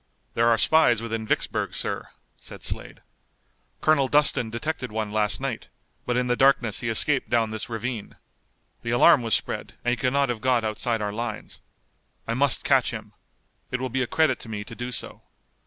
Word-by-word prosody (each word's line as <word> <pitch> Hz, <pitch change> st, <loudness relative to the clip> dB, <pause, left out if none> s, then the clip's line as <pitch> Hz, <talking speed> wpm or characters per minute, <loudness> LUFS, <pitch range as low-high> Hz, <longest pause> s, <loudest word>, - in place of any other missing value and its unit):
"There 115 Hz, 0 st, +2 dB
are 115 Hz, -1 st, +4 dB
spies 120 Hz, -2 st, +4 dB
within 115 Hz, -1 st, -4 dB
Vicksburg, -, -, -1 dB
sir," -, -, -3 dB, 0.3 s
said -, -, -12 dB
Slade. -, -, -5 dB, 0.8 s
"Colonel 140 Hz, -4 st, +3 dB
Dustin 145 Hz, -5 st, +2 dB
detected 125 Hz, +1 st, -4 dB
one 110 Hz, -1 st, -3 dB
last 105 Hz, -1 st, +1 dB
night, 135 Hz, -4 st, -4 dB, 0.4 s
but 120 Hz, 0 st, +1 dB
in 125 Hz, -, +1 dB
the 120 Hz, 0 st, +1 dB
darkness 125 Hz, -5 st, +3 dB
he 120 Hz, -, -3 dB
escaped 130 Hz, +4 st, +2 dB
down 115 Hz, -2 st, +1 dB
this 110 Hz, +1 st, -5 dB
ravine. 115 Hz, -1 st, -5 dB, 0.7 s
The 115 Hz, -, -5 dB
alarm 120 Hz, +1 st, +6 dB
was 115 Hz, -2 st, +2 dB
spread -, -, -4 dB
and 120 Hz, -, +2 dB
he -, -, +2 dB
could 130 Hz, -1 st, 0 dB
not 140 Hz, -1 st, +2 dB
have 115 Hz, -3 st, -3 dB
got 125 Hz, -2 st, +2 dB
outside 110 Hz, +1 st, -1 dB
our 105 Hz, 0 st, -2 dB
lines. 115 Hz, -1 st, -6 dB, 0.7 s
I 115 Hz, -, -1 dB
must 135 Hz, 0 st, +1 dB
catch -, -, +3 dB
him. -, -, -7 dB, 0.6 s
It 125 Hz, -, -2 dB
will 130 Hz, 0 st, -3 dB
be 130 Hz, +2 st, -1 dB
a 125 Hz, -, 0 dB
credit 160 Hz, +5 st, +2 dB
to 115 Hz, -, -10 dB
me 105 Hz, -2 st, -4 dB
to 110 Hz, -, -11 dB
do 120 Hz, +2 st, -5 dB
so. -, -, -6 dB
120 Hz, 190 wpm, -25 LUFS, 110-130 Hz, 0.8 s, alarm